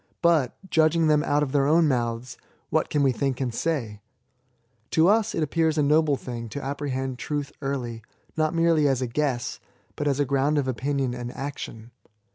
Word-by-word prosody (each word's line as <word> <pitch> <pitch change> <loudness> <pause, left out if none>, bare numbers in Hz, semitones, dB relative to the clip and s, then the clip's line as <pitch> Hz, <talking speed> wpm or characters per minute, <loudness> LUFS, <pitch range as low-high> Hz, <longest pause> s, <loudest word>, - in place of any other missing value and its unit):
But, 160 -7 +3
judging 160 -1 +3
them 150 -1 +3
out 145 -1 +2
of 135 - -3
their 140 -1 +2
own 160 +2 +4
mouths, 120 -2 -1 0.4
what - - +1
can 145 -1 +1
we 135 - +4
think 135 +1 -1
and 125 -3 -2
say? 115 -8 -2 0.9
To 160 +1 +4
us 220 +2 +3
it 160 - +1
appears 160 +1 +1
a 150 - +3
noble 150 0 +3
thing 120 -2 -6
to 145 - -6
apprehend 135 -2 -3
truth 145 -2 -3
early, 125 -5 -3 0.3
not 155 -1 +1
m^ely 165 -3 +3
as 130 -2 +1
a - - -1
guess, 120 -2 -2 0.4
but 145 - -2
as 140 -1 +1
a 145 - +3
ground 140 +3 +1
of 140 -2 0
opinion 130 0 -1
and 120 0 -5
action. 125 -5 -7
140 Hz, 185 wpm, -25 LUFS, 125-155 Hz, 0.9 s, own